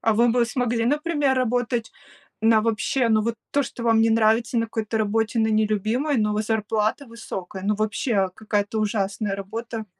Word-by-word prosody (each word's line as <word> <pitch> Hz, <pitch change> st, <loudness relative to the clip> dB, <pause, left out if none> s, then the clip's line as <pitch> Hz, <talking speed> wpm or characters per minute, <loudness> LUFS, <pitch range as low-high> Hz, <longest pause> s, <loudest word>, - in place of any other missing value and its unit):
А 225 Hz, -, +2 dB
вы 235 Hz, +2 st, +4 dB
бы 240 Hz, 0 st, +3 dB
смогли, 235 Hz, -1 st, -1 dB
например, 295 Hz, -1 st, +1 dB
работать 245 Hz, -2 st, -1 dB, 0.5 s
на 220 Hz, 0 st, +4 dB
вообще, 230 Hz, +2 st, 0 dB
ну 215 Hz, -1 st, +3 dB
вот 230 Hz, +1 st, -1 dB, 0.2 s
то, 285 Hz, -, +2 dB
что 240 Hz, -1 st, -7 dB
вам 225 Hz, -1 st, +3 dB
не 225 Hz, 0 st, +3 dB
нравится 225 Hz, +2 st, +2 dB
на 230 Hz, -, 0 dB
какой-то 220 Hz, 0 st, -3 dB
работе 225 Hz, +2 st, 0 dB
на 220 Hz, -, +2 dB
нелюбимой, 220 Hz, +6 st, +1 dB
но 210 Hz, -1 st, +1 dB
вот 215 Hz, +1 st, -1 dB
зарплата 220 Hz, +4 st, -1 dB
высокая? 195 Hz, -5 st, -7 dB
Ну 210 Hz, +1 st, +1 dB
вообще 210 Hz, -2 st, 0 dB
какая-то 215 Hz, 0 st, -1 dB
ужасная 205 Hz, -1 st, -1 dB
работа. 220 Hz, +2 st, -6 dB
225 Hz, 175 wpm, -23 LUFS, 215-235 Hz, 0.5 s, вы